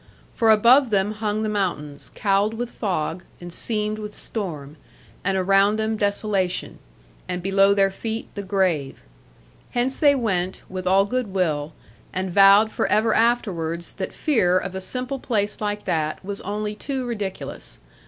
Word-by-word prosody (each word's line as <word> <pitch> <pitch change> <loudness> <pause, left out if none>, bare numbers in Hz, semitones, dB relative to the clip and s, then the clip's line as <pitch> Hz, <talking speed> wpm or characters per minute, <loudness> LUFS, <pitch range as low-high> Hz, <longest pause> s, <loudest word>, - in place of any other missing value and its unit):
For 225 -2 +2
above 235 +5 +6
them 200 -1 +1
hung 215 0 -2
the - - 0
mountains, 180 -9 -3
cowled 205 +2 +1
with 240 +1 -4
fog, 180 -4 -2 0.2
and 175 -1 -9
seamed 215 0 -2
with 210 -1 -7
storm; 155 -9 -6 0.5
and 195 0 +1
around 195 +2 +4
them 220 0 0
desolation; 200 -3 -1 0.5
and 180 -1 -4
below 195 +1 +4
their 195 -1 +3
feet 225 +3 -4
the 205 - -5
grave. 185 -8 -1 0.7
Hence 250 +2 0
they 290 -2 +5
went, 190 -7 -1
with 185 -1 -5
all 195 +2 +4
goodwill; 185 -10 -1 0.4
and 185 0 -2
vowed 200 +3 +7
for - - 0
ever 220 +1 +3
afterwards 175 -8 0
that 190 - -3
fear 185 - +2
of 185 - -3
a 190 - -4
simple 255 +6 -4
place 210 -5 -1
like 210 0 -2
that 155 +2 -1
was 200 0 -5
only 210 +1 -3
too 260 +4 -4
ridiculous. 205 - -5
200 Hz, 155 wpm, -23 LUFS, 185-220 Hz, 0.7 s, vowed